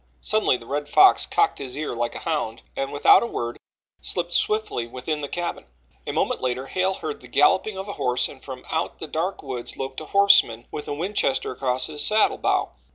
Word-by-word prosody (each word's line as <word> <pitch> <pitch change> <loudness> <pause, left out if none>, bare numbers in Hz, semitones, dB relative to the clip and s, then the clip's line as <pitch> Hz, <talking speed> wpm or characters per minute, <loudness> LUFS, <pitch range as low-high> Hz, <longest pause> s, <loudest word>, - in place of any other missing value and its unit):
Suddenly 215 -11 +2
the 115 - -14
Red 145 +3 -3
Fox 385 0 +6
cocked 415 0 +1
his 130 -1 -6
ear 150 -3 -3
like 120 0 -2
a - - -8
hound, 150 -9 -2
and 135 0 -2
without 145 - +6
a 235 - -1
word 120 - -4 0.4
slipped 175 0 -1
swiftly 215 - 0
within 130 +6 -4
the 145 - -3
cabin. 175 0 -4 0.4
A - - -1
moment - - -1
later 130 +1 -2
Hale 185 +6 0
heard 155 -4 -6
the 125 - -12
galloping 185 - +3
of 190 +1 -5
a 200 - -4
horse 125 0 0
and - - -14
from - - -9
out - - -2
the - - -6
dark 175 +4 -3
woods 130 -4 -5
loped 135 +2 -5
a - - -7
horseman 200 - +4
with 150 - -6
a - - -2
Winchester 170 -4 0
across 130 0 -1
his 150 -1 -3
saddle 215 +7 +3
bow. - - +1
145 Hz, 210 wpm, -24 LUFS, 125-190 Hz, 0.4 s, Fox